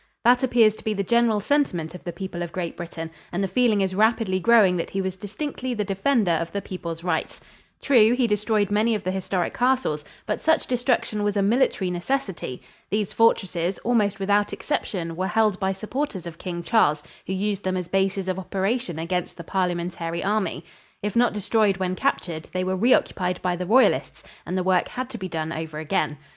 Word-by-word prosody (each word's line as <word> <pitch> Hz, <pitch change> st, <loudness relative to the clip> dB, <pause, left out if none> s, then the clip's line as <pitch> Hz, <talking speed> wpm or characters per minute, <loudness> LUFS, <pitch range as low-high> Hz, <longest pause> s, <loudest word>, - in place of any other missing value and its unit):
That 245 Hz, +1 st, +5 dB
appears 240 Hz, -4 st, +4 dB
to -, -, -14 dB
be 215 Hz, -1 st, -1 dB
the 200 Hz, -, -1 dB
general 235 Hz, 0 st, +3 dB
sentiment 205 Hz, -, 0 dB
of 180 Hz, -, -10 dB
the 175 Hz, -, -3 dB
people 185 Hz, -1 st, -6 dB
of 170 Hz, -1 st, -4 dB
Great 175 Hz, -2 st, -4 dB
Britain, 165 Hz, -1 st, -6 dB, 0.2 s
and 180 Hz, +3 st, -1 dB
the -, -, +1 dB
feeling 230 Hz, -1 st, +2 dB
is 190 Hz, -1 st, 0 dB
rapidly 215 Hz, -2 st, +2 dB
growing 210 Hz, -3 st, +5 dB
that 170 Hz, -, -3 dB
he 195 Hz, -, -3 dB
was 190 Hz, -1 st, -2 dB
distinctly 245 Hz, +5 st, -4 dB
the 210 Hz, -, 0 dB
defender 195 Hz, +1 st, +1 dB
of 165 Hz, 0 st, -1 dB
the 200 Hz, -, -2 dB
people's 170 Hz, -4 st, -6 dB
rights. 175 Hz, -3 st, -2 dB, 0.4 s
True, 240 Hz, -4 st, +5 dB
he 250 Hz, -1 st, +2 dB
destroyed 210 Hz, -1 st, +1 dB
many 220 Hz, +2 st, +2 dB
of 205 Hz, -, -4 dB
the 185 Hz, -, -1 dB
historic 190 Hz, -1 st, -2 dB
castles, 250 Hz, -, +1 dB, 0.2 s
but -, -, -2 dB
such 320 Hz, 0 st, +2 dB
destruction 245 Hz, -4 st, 0 dB
was 205 Hz, 0 st, 0 dB
a 200 Hz, -, +3 dB
military 200 Hz, -4 st, +2 dB
necessity. 180 Hz, -, -3 dB, 0.3 s
These 210 Hz, -1 st, -1 dB
fortresses, 190 Hz, -5 st, +2 dB
almost 215 Hz, -4 st, +1 dB
without 205 Hz, +1 st, +2 dB
exception, 175 Hz, -, -3 dB
were 185 Hz, +2 st, -1 dB
held 215 Hz, -2 st, +2 dB
by 190 Hz, -1 st, +1 dB
supporters 215 Hz, -, -4 dB
of 170 Hz, -1 st, -8 dB
King 175 Hz, -2 st, -5 dB
Charles, 150 Hz, -11 st, +3 dB, 0.2 s
who 190 Hz, -, -2 dB
used 200 Hz, +1 st, -1 dB
them 185 Hz, 0 st, -1 dB
as 180 Hz, -2 st, -3 dB
bases 195 Hz, +1 st, 0 dB
of 185 Hz, 0 st, -1 dB
operation 190 Hz, 0 st, -2 dB
against 175 Hz, +2 st, -3 dB
the 170 Hz, -, -7 dB
Parliamentary 175 Hz, -2 st, -2 dB
Army. 210 Hz, 0 st, -1 dB, 0.4 s
If 210 Hz, +1 st, -2 dB
not 240 Hz, +1 st, +4 dB
destroyed 210 Hz, -1 st, +1 dB
when 185 Hz, -1 st, -1 dB
captured, 160 Hz, -3 st, -2 dB
they 185 Hz, 0 st, 0 dB
were 185 Hz, +1 st, 0 dB
re 230 Hz, +7 st, +2 dB
occupied 180 Hz, -1 st, -1 dB
by 180 Hz, -1 st, +1 dB
the 180 Hz, 0 st, -4 dB
Royalists 255 Hz, +6 st, +3 dB, 0.2 s
and 185 Hz, -, -2 dB
the 185 Hz, -, 0 dB
work 185 Hz, -1 st, +2 dB
had 255 Hz, +1 st, -5 dB
to 235 Hz, -, -7 dB
be 185 Hz, -1 st, -5 dB
done 160 Hz, -1 st, -3 dB
over 160 Hz, -1 st, -5 dB
again. 155 Hz, -1 st, -1 dB
195 Hz, 200 wpm, -24 LUFS, 180-220 Hz, 0.4 s, That